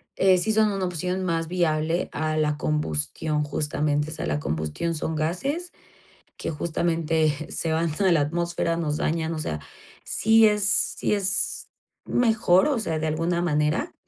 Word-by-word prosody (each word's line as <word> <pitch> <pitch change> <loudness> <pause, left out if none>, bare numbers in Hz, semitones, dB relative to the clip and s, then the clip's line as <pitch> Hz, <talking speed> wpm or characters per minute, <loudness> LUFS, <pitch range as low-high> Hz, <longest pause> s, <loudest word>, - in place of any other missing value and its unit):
eh, 190 -1 +4
sí 210 +5 0
son 215 -1 +3
una 195 -2 -2
opción 180 +2 -2
más 165 -2 -1
viable 165 -1 0
a 155 0 -2
la 150 -1 +1
combustión, 150 - 0
justamente. 150 +1 -1
O - - -4
sea, - - -4
la 75 0 -1
combustión 80 - -2
son 160 +1 -3
gases 270 - -2 0.7
que - - -4
justamente 165 0 0 0.2
se 160 -1 -1
van 165 +1 +1
a 190 -2 +4
la 160 - +3
atmósfera, 170 +2 -1
nos 155 -3 -1
dañan. 160 0 -1
O - - -4
sea, 75 - -3 0.4
sí 225 0 +4
es 210 -1 +2 0.3
sí - - +1
es 195 -1 -1 0.3
mejor, 225 -4 +3
o 280 - +1
sea, 165 -8 -2
de 160 - -2
alguna 165 +3 0
manera, 155 - 0
165 Hz, 160 wpm, -25 LUFS, 155-185 Hz, 0.7 s, eh